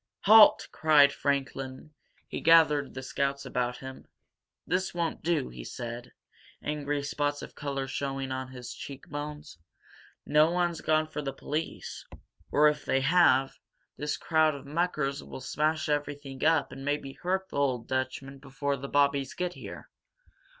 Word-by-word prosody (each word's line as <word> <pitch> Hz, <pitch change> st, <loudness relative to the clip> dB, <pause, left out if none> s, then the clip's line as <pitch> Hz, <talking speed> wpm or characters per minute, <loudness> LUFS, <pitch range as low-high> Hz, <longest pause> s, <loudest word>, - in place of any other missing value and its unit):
"Halt!" 215 Hz, +1 st, +7 dB
cried 145 Hz, -3 st, +5 dB
Franklin. 135 Hz, 0 st, -3 dB, 0.4 s
He -, -, -5 dB
gathered 155 Hz, -4 st, +5 dB
the 130 Hz, -, -5 dB
scouts 140 Hz, +1 st, -2 dB
about 125 Hz, -1 st, -2 dB
him. 130 Hz, 0 st, -10 dB, 0.6 s
"This 185 Hz, 0 st, -1 dB
won't 170 Hz, -1 st, -2 dB
do," 165 Hz, -, 0 dB
he -, -, -9 dB
said, 120 Hz, -, -7 dB, 0.5 s
angry 145 Hz, -1 st, -2 dB
spots 145 Hz, 0 st, -2 dB
of -, -, -9 dB
color 140 Hz, -2 st, -3 dB
showing 135 Hz, 0 st, -3 dB
on 130 Hz, 0 st, -3 dB
his 125 Hz, -2 st, -8 dB
cheek 140 Hz, -2 st, -9 dB
bones. 150 Hz, -, -7 dB, 0.7 s
"No 150 Hz, +2 st, +4 dB
one's 175 Hz, -1 st, 0 dB
gone 155 Hz, 0 st, +2 dB
for 155 Hz, -1 st, -5 dB
the 140 Hz, -2 st, -3 dB
police 155 Hz, +4 st, -5 dB, 0.4 s
or, 150 Hz, +1 st, +5 dB
if 150 Hz, 0 st, 0 dB
they 135 Hz, -, +1 dB
have, 140 Hz, -3 st, +4 dB, 0.4 s
this 150 Hz, 0 st, -2 dB
crowd 160 Hz, -2 st, +2 dB
of 140 Hz, -1 st, -10 dB
muckers 150 Hz, -2 st, -1 dB
will -, -, -8 dB
smash 155 Hz, +4 st, -1 dB
everything 145 Hz, -2 st, -3 dB
up 160 Hz, +1 st, +3 dB
and 135 Hz, -, -8 dB
maybe 145 Hz, -1 st, -2 dB
hurt 190 Hz, +4 st, -2 dB
the -, -, -6 dB
old 130 Hz, -5 st, 0 dB
Dutchman 130 Hz, +1 st, -3 dB
before 140 Hz, +1 st, -3 dB
the 135 Hz, +1 st, -7 dB
Bobbies 140 Hz, -1 st, +2 dB
get 180 Hz, 0 st, -2 dB
here. -, -, -9 dB
145 Hz, 150 wpm, -29 LUFS, 135-155 Hz, 0.7 s, Halt